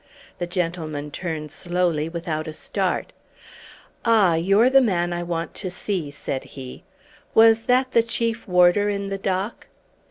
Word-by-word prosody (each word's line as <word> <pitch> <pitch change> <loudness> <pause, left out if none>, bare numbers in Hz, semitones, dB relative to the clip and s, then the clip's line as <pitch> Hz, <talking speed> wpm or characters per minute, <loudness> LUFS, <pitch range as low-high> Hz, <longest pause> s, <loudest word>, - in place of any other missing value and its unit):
The 175 - -2
gentleman 165 -4 -3
turned 155 -2 -5
slowly 175 -2 -1
without 165 -2 -4
a 155 - -5
start. - - -2 0.9
"Ah, 215 -7 +4
you're 195 +8 +4
the 270 0 +7
man 175 -7 +1
I 175 - -3
want 170 -1 -3
to 185 - -4
see," 180 -3 -3
said 140 -2 -5
he. 130 -2 -10 0.5
"Was 225 0 +6
that 255 +1 +2
the 230 - +5
Chief 230 0 -2
Warder 180 +3 +4
in 200 -1 -2
the 195 0 -3
dock?" 195 +3 -3
180 Hz, 150 wpm, -23 LUFS, 165-205 Hz, 0.9 s, the